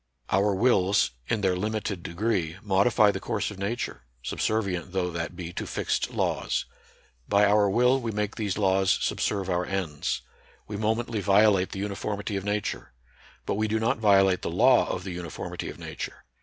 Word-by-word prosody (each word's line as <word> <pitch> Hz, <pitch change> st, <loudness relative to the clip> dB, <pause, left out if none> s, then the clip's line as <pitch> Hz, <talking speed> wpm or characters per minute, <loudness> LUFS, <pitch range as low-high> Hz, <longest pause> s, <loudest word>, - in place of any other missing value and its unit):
Our 100 Hz, +1 st, +3 dB
wills, 100 Hz, -, +3 dB, 0.2 s
in 115 Hz, -, 0 dB
their 95 Hz, -2 st, +2 dB
limited 105 Hz, -1 st, -2 dB
degree, 90 Hz, -2 st, -1 dB
modify 100 Hz, +1 st, +4 dB
the -, -, -4 dB
course 105 Hz, -1 st, -2 dB
of 100 Hz, -, -10 dB
Nature, 105 Hz, -, -3 dB, 0.2 s
subservi 110 Hz, -4 st, 0 dB
ent 90 Hz, +1 st, -7 dB
though 90 Hz, -2 st, 0 dB
that 85 Hz, +1 st, -4 dB
be 85 Hz, -1 st, -6 dB
to -, -, -4 dB
fixed -, -, -1 dB
laws. -, -, -1 dB, 0.6 s
By 100 Hz, +1 st, +5 dB
our 105 Hz, 0 st, +4 dB
will 125 Hz, +5 st, +3 dB
we 115 Hz, -, -3 dB
make 105 Hz, 0 st, -2 dB
these 105 Hz, -4 st, -2 dB
laws 95 Hz, -2 st, +3 dB
subserve 100 Hz, -3 st, -1 dB
our 90 Hz, -1 st, 0 dB
ends. 90 Hz, -7 st, -2 dB, 0.4 s
"We 105 Hz, -, -5 dB
momently 110 Hz, +1 st, -1 dB
violate 100 Hz, -1 st, +4 dB
the -, -, -7 dB
uniformity 100 Hz, +1 st, -3 dB
of 95 Hz, -, -2 dB
Nature. 105 Hz, -9 st, -3 dB, 0.5 s
But -, -, -1 dB
we 110 Hz, -, +2 dB
do 110 Hz, +1 st, 0 dB
not 110 Hz, 0 st, +1 dB
violate 95 Hz, -3 st, +4 dB
the -, -, -3 dB
law 120 Hz, +8 st, +4 dB
of -, -, -3 dB
the 95 Hz, -, -5 dB
uniformity 85 Hz, -2 st, -5 dB
of -, -, -9 dB
Nature. -, -, -7 dB
100 Hz, 175 wpm, -27 LUFS, 95-110 Hz, 0.6 s, By